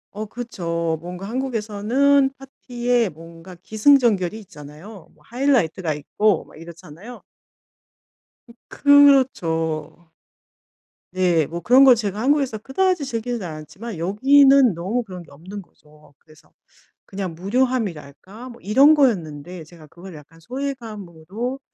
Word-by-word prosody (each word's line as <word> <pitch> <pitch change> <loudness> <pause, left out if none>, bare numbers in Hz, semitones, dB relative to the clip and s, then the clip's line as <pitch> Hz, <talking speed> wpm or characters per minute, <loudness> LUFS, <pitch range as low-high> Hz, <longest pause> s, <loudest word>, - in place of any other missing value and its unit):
어 215 +1 -5
그쵸. 170 -9 -4
뭔가 180 +3 -8
한국에서는 255 +3 +1
파티에 245 -4 -2
뭔가 165 +3 -13
기승전결이 220 0 +2
있잖아요. 160 +3 -13
뭐 - - -27
하이라이트가 230 - 0
있고 210 +8 0
막 - - -19
이렇잖아요. 170 +7 -12 1.3
음 - - -14
그렇죠. 170 - +2 1.0
네, 175 -4 +1
뭐 170 +4 -6
그런 250 +10 +5
걸 255 -2 +7
제가 210 -2 -4
한국에서 275 -4 +1
그다지 340 - -1
즐기지 235 -3 -4
않았지만, 170 +6 -8
여기는 265 - +4
너무 195 +9 -3
그런 185 -5 -10
게 165 - -17
없는 185 +8 -10
거죠. 150 -4 -23
그래서 155 -1 -23 0.6
그냥 190 -4 -6
무료함이랄까? 205 - -3
뭐 240 - -14
이런 270 +10 +5
거였는데 175 - -1
제가 160 -1 -16
그걸 175 +4 -13
약간 155 +2 -16
소외감으로 230 - -6
205 Hz, 290 characters per minute, -21 LUFS, 165-250 Hz, 1.3 s, 걸